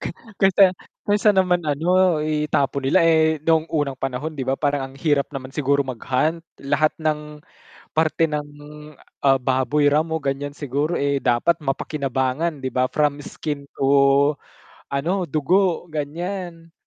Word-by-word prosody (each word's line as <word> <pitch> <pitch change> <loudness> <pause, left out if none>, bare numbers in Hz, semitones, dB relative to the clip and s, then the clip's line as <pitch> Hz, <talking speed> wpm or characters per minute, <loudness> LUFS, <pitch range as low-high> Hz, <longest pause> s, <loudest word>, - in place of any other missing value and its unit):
ka - - -4 0.3
kaysa 195 -1 +5 0.3
kaysa 205 0 +3
naman 180 -2 +3
ano 170 +2 +2
itapon 150 -3 -1
nila, 170 +4 +4
eh, 160 -1 +4
noong 160 0 +2
unang 145 -4 -2
panahon 135 +4 -3
'di 135 -4 -6
ba 135 - +1
parang 140 -1 -1
ang - - -17
hirap 145 -2 +1
naman 130 -1 -6
siguro 140 -1 +1
mag-hunt, 130 +5 -1 0.2
lahat 155 +2 +1
ng 150 -1 -3 0.5
parte 160 +1 +2
ng, 150 -1 -3 0.8
ah, 135 -1 +4
baboy 130 +3 +1
ramo 160 +2 +1
ganiyan 140 0 -3
siguro, 145 +3 -2
eh, 140 -2 0
dapat 130 +8 +2
mapakinabangan 135 +2 -2
'di 130 - -4
ba 130 0 +1
from 145 -1 0
skin 145 -2 -5 0.2
to 140 +1 +4 0.6
ano 170 +8 -1
dugo, 175 +4 +1
ganiyan. 165 +2 -5
150 Hz, 140 wpm, -22 LUFS, 140-165 Hz, 0.8 s, kaysa